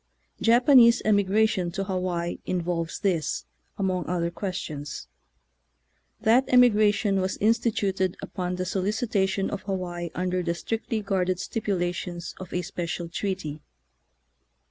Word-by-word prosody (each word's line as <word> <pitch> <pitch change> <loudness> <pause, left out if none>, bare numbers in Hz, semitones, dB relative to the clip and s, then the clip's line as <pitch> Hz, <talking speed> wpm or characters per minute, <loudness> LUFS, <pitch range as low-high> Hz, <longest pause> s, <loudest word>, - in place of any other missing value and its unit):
Japanese 240 0 +6
emigration 205 -2 +2
to 195 +3 -3
Hawaii 180 -3 -2
involves 170 -2 -2
this, 170 - 0 0.3
among 185 -3 -1
other 170 -1 -1
ques 180 +2 -4
tions. 145 - -6 1.1
That 230 +4 +4
emigration 210 -5 +4
was 185 0 -2
instituted 205 -4 +1
upon 180 -2 -4
the 185 0 -3
solicitation 195 0 0
of - - -4
Hawaii 180 -3 -4
under 180 0 0
the 170 -1 -1
strictly 225 +3 -3
guarded 185 -2 0
stipulations 175 -5 -3
of 185 -1 -8
a 180 - -1
special 175 -2 -4
treaty. 165 -5 -3
185 Hz, 115 wpm, -26 LUFS, 175-210 Hz, 1.1 s, Japanese